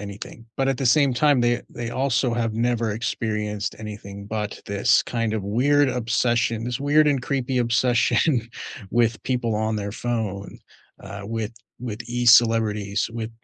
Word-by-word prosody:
anything, 105 +3 -9
but 135 0 +1
at 135 - +1
the 135 - -1
same 140 +1 +4
time 145 -1 +3
they 120 0 +1
they 120 -1 -5
also 130 -2 0
have 115 -2 -1
never 115 -1 0
experienced 105 -2 -3
anything 100 -2 -8
but 105 -1 -4
this 100 +2 +3
kind 115 -2 -2
of 110 - -2
weird 140 +7 +3
obsession, 120 -1 0
this 120 0 -3
weird 150 +2 +4
and 140 -3 +1
creepy 130 -1 -1
obsession 120 +2 +2 0.4
with 115 -1 +2
people 120 -3 -1
on 110 0 -1
their 100 -1 -3
phone, 110 -5 -3 0.5
uh, 100 +1 -8
with 115 +1 -4 0.3
with 115 -2 -5
e-celebrities, 115 -4 +3
with 115 -1 -4
115 Hz, 150 wpm, -23 LUFS, 105-125 Hz, 0.5 s, same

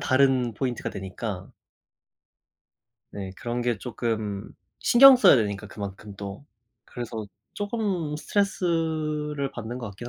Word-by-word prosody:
다른 130 -3 +3
포인트가 125 0 -2
되니까 95 0 -5 1.6
네 95 -2 -6
그런 120 0 -3
게 120 -3 0
쪼끔 110 -4 -3 0.3
신경 265 +2 +9
써야 190 - +7
되니까 100 -3 -1
그만큼 100 0 -7
또. 100 +7 -7 0.4
그래서 115 -3 -6 0.3
쪼금 200 -8 -2
스트레스를 155 -6 -1
받는 120 +1 -6
것 120 - -5
같긴 120 +5 -8
125 Hz, 245 characters per minute, -26 LUFS, 105-155 Hz, 1.6 s, 신경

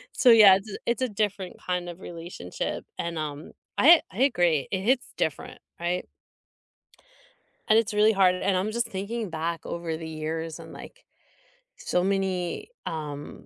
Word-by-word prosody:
So 250 - +5
yeah, 210 -4 +9
it's 200 +2 -6
a - - -5
it's 235 +2 0
a 255 - +1
different 200 -3 -2
kind 180 -1 -2
of 175 +1 -8
relationship 170 - -6
and, 170 -1 -3
um, 150 0 -5 0.3
I 330 +4 +8
I 220 - -1
agree. 175 - +2
It 190 - 0
hits 250 +5 +1
different, - - -3 0.2
right? 175 +1 -2 1.6
And 220 - +6
it's 220 -2 +1
really 210 +1 +4
hard, 190 -2 +4
and 190 0 0
I'm 200 +4 -1
just 235 +1 0
thinking 215 +2 -4
back 165 0 -4
over 170 -2 -4
the 160 - -7
years 160 +1 -4
and - - -11
like - - -12 0.7
so 180 - 0
many, 190 - -1 0.2
um, 150 -2 -6
185 Hz, 160 wpm, -26 LUFS, 165-215 Hz, 1.6 s, yeah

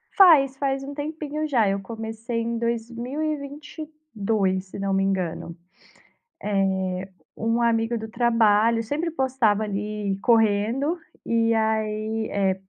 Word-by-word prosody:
Faz, 295 -9 +7
faz 270 -1 -1
um 280 +1 -6
tempinho 305 +1 -4
já. 235 -8 +3
Eu 195 0 0
comecei 225 +2 -5
em 230 0 -2
2022, 245 - -3
se 195 - -9
não 195 0 -1
me 195 0 +2
engano. 180 -3 -2 0.9
Eh, 190 -2 0 0.3
um 230 +1 0
amigo 230 0 +2
do 220 0 -6
trabalho 230 -1 +3
sempre 310 +9 -2
postava, 255 -7 +1
ali, 205 -1 -2
correndo. 230 - +2 0.3
E 230 0 +2
aí 220 0 0
eh, 195 -2 +1
225 Hz, 120 wpm, -24 LUFS, 205-270 Hz, 0.9 s, Faz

